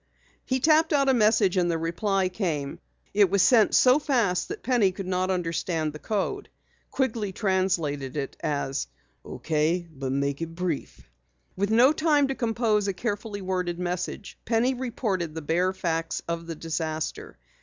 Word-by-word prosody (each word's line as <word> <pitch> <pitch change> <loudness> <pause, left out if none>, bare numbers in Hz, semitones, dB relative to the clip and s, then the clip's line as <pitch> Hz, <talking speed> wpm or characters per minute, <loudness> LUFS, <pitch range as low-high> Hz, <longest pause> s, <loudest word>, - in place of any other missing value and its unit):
He 260 0 +1
tapped 315 +3 +4
out 275 -2 +3
a - - +5
message 215 -5 +3
and 175 -1 +2
the 165 - +1
reply 190 +4 0
came. 165 -8 -3 0.3
It 200 -2 +4
was 195 0 +3
sent 230 -5 +5
so 255 +3 +6
fast 235 - +1
that 410 +3 -7
Penny 235 -7 +3
could 195 +1 -7
not 185 0 -1
understand 165 -3 -1
the 150 - -8
code. 220 - -2 0.4
Quigley 225 -6 -1
translated 175 - -1
it 140 -1 -3
as 140 - -2 0.4
"Okay, 165 +3 -1
but 135 -2 -4
make 140 +2 -1
it 165 0 -5
brief." 175 -4 -3 0.5
With 200 +2 -1
no 240 +6 +5
time 295 -3 +2
to - - 0
compose 225 -4 0
a 195 - 0
carefully 205 -1 -4
worded 180 -2 -2
message, 180 +2 -4
Penny 235 +3 +1
reported 210 -10 -3
the 160 - -5
bare 175 +5 +1
facts 165 -3 -2
of 170 0 -4
the 165 - -5
disaster. 160 0 -4
185 Hz, 160 wpm, -26 LUFS, 165-225 Hz, 0.5 s, so